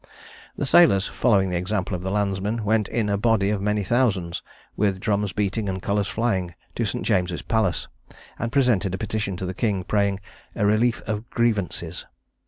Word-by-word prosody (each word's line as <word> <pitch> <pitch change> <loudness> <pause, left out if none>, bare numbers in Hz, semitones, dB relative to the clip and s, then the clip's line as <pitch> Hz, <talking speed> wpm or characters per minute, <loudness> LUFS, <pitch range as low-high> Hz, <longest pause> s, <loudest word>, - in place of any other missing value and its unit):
The - - -1
sailors, 130 - +5
following 100 -6 +2
the 90 - 0
example 95 +1 -2
of 90 - -2
the 95 - -3
landsmen, 100 +2 -1
went 110 0 +2
in 110 -2 -1
a 100 -1 0
body 105 -3 +2
of 105 -2 -1
many 105 0 0
thousands, 100 -6 +1 0.3
with 100 -2 +1
drums 100 0 0
beating 105 +2 -1
and 95 0 -2
colours 100 +1 0
flying, 95 -6 -1 0.2
to - - -1
St. - - -3
James's 90 -1 0
Palace, 110 -6 0 0.5
and 115 +1 -2
presented 115 -9 +2
a - - -4
petition 110 -4 -3
to 95 - -4
the 90 - -3
king, 100 -2 -1
praying 100 0 +1 0.4
a 105 - +1
"Relief 110 +3 +2
of 110 +2 -4
Grievances." 100 -7 -1
100 Hz, 180 wpm, -24 LUFS, 95-110 Hz, 0.5 s, sailors